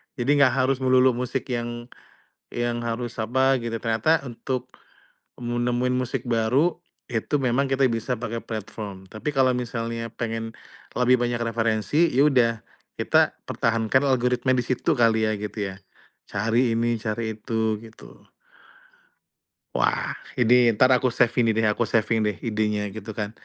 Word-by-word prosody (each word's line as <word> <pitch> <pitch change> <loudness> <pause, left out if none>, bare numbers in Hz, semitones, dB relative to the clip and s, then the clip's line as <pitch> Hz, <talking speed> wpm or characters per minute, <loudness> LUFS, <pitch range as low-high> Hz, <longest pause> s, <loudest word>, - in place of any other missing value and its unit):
Jadi 125 +1 -3
nggak 135 -2 +5
harus 135 0 +1
melulu 130 0 +4
musik 125 +2 -3
yang, 120 0 -4 0.6
yang 120 0 -1
harus 115 +1 -4
apa 130 +4 +2
gitu. 115 -1 -4
Ternyata 115 +8 +2
untuk, 125 +1 -5 0.7
mu 120 0 -3
nemuin 125 +1 0
musik 130 0 -3
baru 125 +10 +2 0.3
itu 120 +5 -1
memang 130 +1 +1
kita 135 0 +3
bisa 115 +2 -2
pakai 115 0 -4
platform. 105 -3 -7
Tapi 110 +9 -4
kalau 130 -2 +3
misalnya 115 -1 -4
pengen, 115 -1 -4 0.5
lebih 125 +1 +5
banyak 120 -1 0
referensi, 115 - +1
ya 140 +4 +4
udah 125 -5 +3 0.5
kita - - +3 0.2
pertahankan 115 +3 +1
algoritma 125 -1 +1
di 125 - +2
situ 130 +6 0
kali 110 -1 +3
ya - - +1
gitu 105 +1 -6 0.2
ya. - - -14 0.5
Cari 115 +3 +1
ini, 115 0 0
cari 110 0 -3
itu 110 0 -1
gitu. 110 0 -14 1.5
Wah - - 0 0.2
ini 120 -1 +4 0.2
entar 130 +4 +4
aku 130 0 +4
save 120 - +3
ini 115 -2 +3
deh, 110 - +1
aku 115 +2 0
saving 115 0 +1
deh 105 - -1
idenya 105 -1 -1
gitu 110 0 -7
kan. 105 -1 -2
120 Hz, 150 wpm, -24 LUFS, 110-125 Hz, 1.5 s, nggak